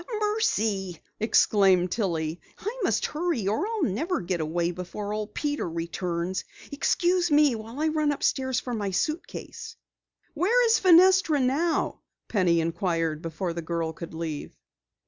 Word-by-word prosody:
"Mercy!" 220 - 0 0.2
exclaimed 195 -4 +3
Tillie, 170 -6 -2 0.2
"I 450 +6 -5
must - - +1
hurry 305 - -1
or 220 - 0
I'll 445 -4 -2
never 305 - 0
get 175 -1 -2
away 170 +2 -1
before 185 +4 -5
Old 210 0 -5
Peter 290 - -2
returns. 170 +2 -3 0.3
Excuse 350 +4 +1
me 295 -2 +5
while 225 +4 -7
I 315 +1 +2
run 305 -1 +1
upstairs 260 -2 0
for 250 - -5
my 205 -3 -2
suitcase." 305 - -4 0.6
"Where 450 +10 +3
is 450 -1 +4
Fenestra 365 -3 +5
now?" 285 +6 0 0.3
Penny 180 -6 +2
inquired 165 -2 -1
before 170 +2 -3
the 170 - -4
girl 165 -1 -2
could 165 0 -9
leave. 160 -3 -5
215 Hz, 140 wpm, -26 LUFS, -, 0.6 s, me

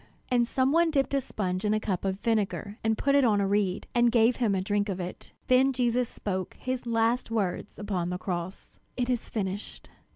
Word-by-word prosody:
And 240 -2 +3
some 260 +2 +1
one 335 +2 +4
dipped 280 -3 +1
a 275 - +2
sponge 185 -6 -3
in 210 0 +2
a - - +1
cup 195 -4 -2
of 190 0 -1
vinegar, 210 -1 -1
and 220 0 +1
put 275 - +1
it 280 -1 +5
upon 215 -4 +3
a 200 - +2
reed, 200 -2 0
and 240 -1 +4
gave 230 0 +4
him 225 -6 +1
a - - +1
drink 205 +1 0
of 190 -1 -3
it. 180 0 -7
Then 260 +2 +4
Jesus 245 -1 +1
spoke 190 -3 -4
his 255 -1 -3
last 230 +1 +1
words 205 -4 -2
upon 190 -4 -2
the 180 - -2
cross: 180 0 -5 0.2
"It 250 0 0
is 245 -2 -2
finished! 200 -1 -5
220 Hz, 215 wpm, -28 LUFS, 195-245 Hz, 0.2 s, it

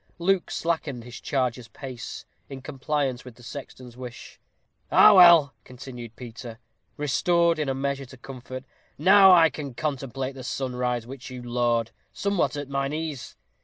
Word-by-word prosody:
Luke 185 +1 +1
slackened 155 -7 -2
his 120 0 -10
charger's 125 -3 -1
pace, 125 +2 -8 0.2
in 135 -1 -9
compliance 135 -2 -2
with 125 -3 -12
the 120 - -17
sexton's 125 -2 -9
wish. 125 -1 -10 0.5
"Ah! 215 - +8
well," 170 -6 +8
continued 125 -3 -10
Peter, 115 -1 -9 0.4
restored 170 +3 +2
in 150 -3 -1
a 135 - -1
measure 140 0 -2
to 130 - -14
comfort; 130 0 -9 0.3
"now 190 +4 +7
I 165 -3 +6
can 140 -5 -7
contemplate 135 -2 -3
the 130 -1 -9
sunrise, 125 -2 -2
which 130 +1 -9
you 125 -1 -8
laud, 120 -1 0 0.2
somewhat 200 -6 0
at 145 -1 -5
mine 135 +1 -2
ease. 155 -4 -5
135 Hz, 150 wpm, -25 LUFS, 125-150 Hz, 0.5 s, Ah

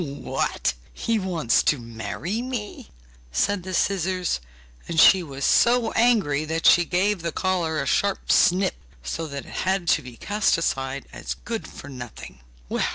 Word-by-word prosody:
'What! 140 -2 -2 0.2
He 230 -1 0
wants 170 - +1
to 150 - +2
marry 120 - -4
me?' 245 -5 -6 0.4
said 200 - +1
the 185 +2 -7
scissors, 185 - 0 0.5
and 165 -1 -1
she 190 +2 +8
was 140 -4 -5
so 240 -1 +4
angry 210 -12 +2
that 160 +1 -3
she 175 0 +6
gave 185 +2 +1
the 170 0 -2
collar 170 -3 0
a - - -1
sharp 200 -1 0
snip, 185 +2 +4 0.3
so 160 - -4
that 140 -2 -6
it - - -9
had 190 -2 0
to 155 - +3
be 125 -3 -11
cast 205 - +1
aside 135 -4 -2
as 60 - -5
good - - -4
for - - -11
nothing. 125 - -9
170 Hz, 160 wpm, -24 LUFS, 140-195 Hz, 0.5 s, she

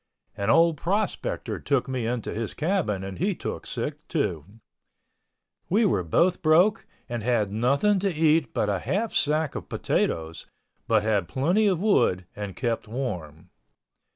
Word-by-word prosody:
An 100 +1 -2
old 165 +3 +4
prospector 200 +6 -2
took 140 -2 0
me 130 -3 -2
into 120 -1 -3
his 110 -1 -4
cabin 155 - 0
and 95 -2 -7
he - - 0
took - - -5
sick, - - -4
too. 75 -3 -1 1.2
We 215 +5 +3
were 100 - +2
both 170 - +2
broke 175 +7 +3 0.2
and 120 -1 -4
had 110 -3 +1
nothing 140 - +2
to 195 +1 0
eat 155 -4 +2
but - - 0
a 100 -2 0
half 215 - -2
sack 155 0 +1
of - - -7
potatoes, 80 0 -2 0.4
but 110 -2 +3
had 105 -5 +1
plenty 175 +11 +2
of 185 -4 +1
wood 135 - +2
and 100 -2 -6
kept 115 -3 -2
warm. 90 - -5
125 Hz, 155 wpm, -26 LUFS, 105-170 Hz, 1.2 s, old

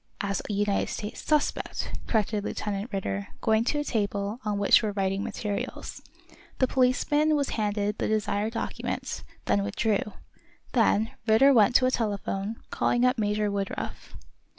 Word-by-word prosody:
"As 200 -1 -1
a - - -1
United 205 0 +1
States 210 +1 -5
suspect," 300 -1 0 0.2
corrected 215 -2 0
Lieutenant 210 +1 -3
Ridder, 100 - -3
going 220 0 +2
to 295 - +1
a 295 - 0
table 205 -3 -1
on 210 -2 -1
which 200 0 +5
were 215 -2 -2
writing 195 0 0
materials. 205 -2 -4 0.6
The 260 - +4
policeman 280 +5 +2
was 285 -2 0
handed 210 -1 -1
the - - 0
desired 215 0 0
document, 230 - -4 0.2
then 100 -1 +2
withdrew. 205 - -1 0.6
Then 225 -2 +3 0.2
Ridder 270 +6 +6
went 230 0 +5
to 255 - +6
a 255 - +3
telephone, 205 -2 -2 0.2
calling 240 +1 +2
up 250 -1 +2
Major 210 0 +1
Woodruff. 200 -1 -4
210 Hz, 150 wpm, -27 LUFS, 200-235 Hz, 0.6 s, Ridder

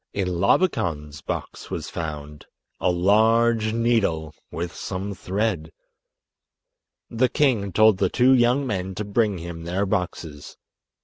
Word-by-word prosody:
In 95 -2 -1
Labakan's 80 - +1
box - - -6
was - - -4
found—a 75 +3 -6
large 110 +4 +3
needle 110 -10 0 0.2
with 85 +1 -5
some 100 +2 -5
thread! 95 -3 -2 1.4
The 120 +2 +2
king 120 -8 +1
told 110 0 +4
the 95 - +2
two 130 +6 +4
young 125 +2 +3
men 95 -5 -3
to 105 - -4
bring 105 -1 +1
him 85 -1 -7
their 90 +4 -1
boxes. 85 -6 -4
100 Hz, 120 wpm, -23 LUFS, 85-115 Hz, 1.4 s, told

